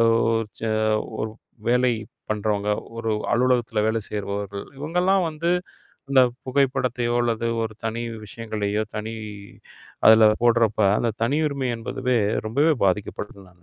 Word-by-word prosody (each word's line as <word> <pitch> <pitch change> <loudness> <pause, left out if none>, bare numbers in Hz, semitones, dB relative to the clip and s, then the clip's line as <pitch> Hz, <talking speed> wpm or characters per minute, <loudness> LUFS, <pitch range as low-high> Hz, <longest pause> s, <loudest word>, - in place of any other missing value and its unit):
ஓ - - +5 0.6
ச - - -14 0.6
ஒரு 110 - -2 0.4
வேலை 125 0 +3 0.4
பண்றவங்க, 105 -1 0 0.3
ஒரு 115 -1 -1 0.2
அலுவலகத்துல 120 -3 +2
வேல 110 0 0
செய்றவர்கள். 100 -1 -4
இவங்க 155 +5 -5
எல்லாம் 190 -1 +3
வந்து 165 +3 -1 0.6
அந்தப் 130 -3 +4
புகைப்படத்தையோ, 130 -3 +1
அல்லது 115 -1 0 0.2
ஒரு 110 -1 -5
தனி 115 +1 -2 0.2
விஷயங்களையோ 105 -1 -2
தனி 110 +1 -4 0.9
அதுல 110 -1 +8
போடுறப்ப 115 -3 +3 0.2
அந்தத் 115 -2 -2
தனியுரிமை 140 -1 0
என்பதுவே 125 +1 -1 0.3
ரொம்பவே 145 +7 +3
பாதிக்கப்படுதுன்னு 100 0 -3
நான் 85 -1 -24
115 Hz, 120 wpm, -24 LUFS, 105-130 Hz, 0.9 s, அதுல